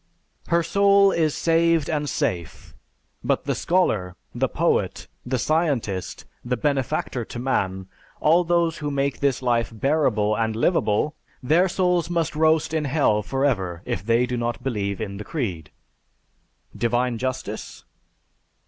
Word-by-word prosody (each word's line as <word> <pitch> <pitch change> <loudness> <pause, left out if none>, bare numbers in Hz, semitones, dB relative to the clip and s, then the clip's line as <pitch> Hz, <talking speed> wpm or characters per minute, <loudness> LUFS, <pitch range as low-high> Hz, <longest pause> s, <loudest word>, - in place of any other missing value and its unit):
Her 170 0 +2
soul 200 +1 +4
is 160 -4 +1
saved 165 -2 +2
and 150 -2 -1
safe, 85 -8 -3 0.5
but - - 0
the - - 0
scholar, 110 - 0 0.2
the - - 0
poet, - - 0 0.2
the 130 +1 0
scientist, 130 - -1 0.2
the 125 0 -1
benefactor 135 -2 -1
to - - -8
mankind, 95 -7 -1 0.3
all 165 +4 +4
those 170 -1 +1
who 150 -1 -2
make 140 -1 -1
this 135 -2 0
life 120 -2 +1
bearable 115 -4 +1
and 110 0 -1
livable, 120 - +1 0.3
their 170 +8 +3
souls 180 -2 +1
must 165 -3 -1
roast 160 0 +2
in 155 -2 0
hell 135 -7 +2
forever 105 -10 -1
if 90 - -3
they 115 +3 +2
do 125 0 -3
not 120 0 -3
believe 100 -6 -2
in 100 -3 -5
the 105 - -6
creed. 95 - -4 1.1
Divine 120 0 0
Justice? 130 -5 -5
130 Hz, 140 wpm, -23 LUFS, 110-160 Hz, 1.1 s, soul